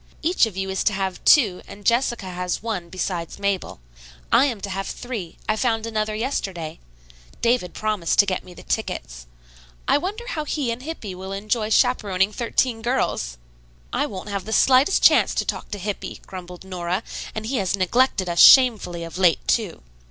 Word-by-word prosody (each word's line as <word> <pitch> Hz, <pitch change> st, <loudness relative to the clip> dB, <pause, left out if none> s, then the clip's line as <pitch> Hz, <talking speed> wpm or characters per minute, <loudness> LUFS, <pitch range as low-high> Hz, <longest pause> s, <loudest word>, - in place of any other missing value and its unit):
Each 330 Hz, -7 st, +3 dB
of 200 Hz, -4 st, -9 dB
you 190 Hz, 0 st, -2 dB
is 190 Hz, -, -1 dB
to 210 Hz, -, +3 dB
have 190 Hz, -1 st, -3 dB
two 210 Hz, -11 st, +5 dB
and 205 Hz, 0 st, -12 dB
Jessica 235 Hz, -3 st, +1 dB
has 180 Hz, +1 st, -3 dB
one 200 Hz, -7 st, -3 dB
besides 175 Hz, -2 st, -4 dB
Mabel. 200 Hz, -, -2 dB, 0.5 s
I 260 Hz, -, +6 dB
am 240 Hz, -7 st, -2 dB
to 200 Hz, -, -5 dB
have 195 Hz, +1 st, -3 dB
three; 230 Hz, -9 st, -6 dB
I 215 Hz, -, +2 dB
found 225 Hz, -1 st, 0 dB
another 215 Hz, -1 st, -2 dB
yesterday. 195 Hz, -, -3 dB, 0.6 s
David 235 Hz, -8 st, +1 dB
promised 215 Hz, -6 st, -1 dB
to 200 Hz, -, +7 dB
get 185 Hz, -2 st, -2 dB
me 180 Hz, -1 st, -13 dB
the -, -, -12 dB
tickets. -, -, -4 dB, 0.6 s
I -, -, +4 dB
wonder 410 Hz, +8 st, -4 dB
how 310 Hz, -9 st, -2 dB
he 285 Hz, -4 st, -2 dB
and 230 Hz, +2 st, -5 dB
Hippy 265 Hz, -, -6 dB
will 190 Hz, +1 st, -8 dB
enjoy 215 Hz, +2 st, -1 dB
chaperoning 210 Hz, -5 st, +2 dB
thirteen 235 Hz, +1 st, 0 dB
girls?" 145 Hz, -, -1 dB, 0.6 s
"I -, -, +1 dB
won't 190 Hz, +1 st, -7 dB
have 200 Hz, -2 st, -3 dB
the 220 Hz, -, -4 dB
slightest 265 Hz, -, +4 dB
chance -, -, +5 dB
to -, -, 0 dB
talk -, -, -4 dB
to 205 Hz, -, -4 dB
Hippy," 205 Hz, +1 st, -5 dB
grumbled 180 Hz, -1 st, -9 dB
Nora, 185 Hz, +1 st, -3 dB, 0.3 s
"and 215 Hz, 0 st, -4 dB
he 255 Hz, +4 st, -1 dB
has 195 Hz, -2 st, 0 dB
neglected 195 Hz, +1 st, +2 dB
us 170 Hz, -1 st, -1 dB
shamefully 215 Hz, -10 st, +6 dB
of 165 Hz, +2 st, -7 dB
late, 180 Hz, -3 st, +3 dB
too." 215 Hz, -8 st, 0 dB
205 Hz, 180 wpm, -23 LUFS, 185-235 Hz, 0.6 s, to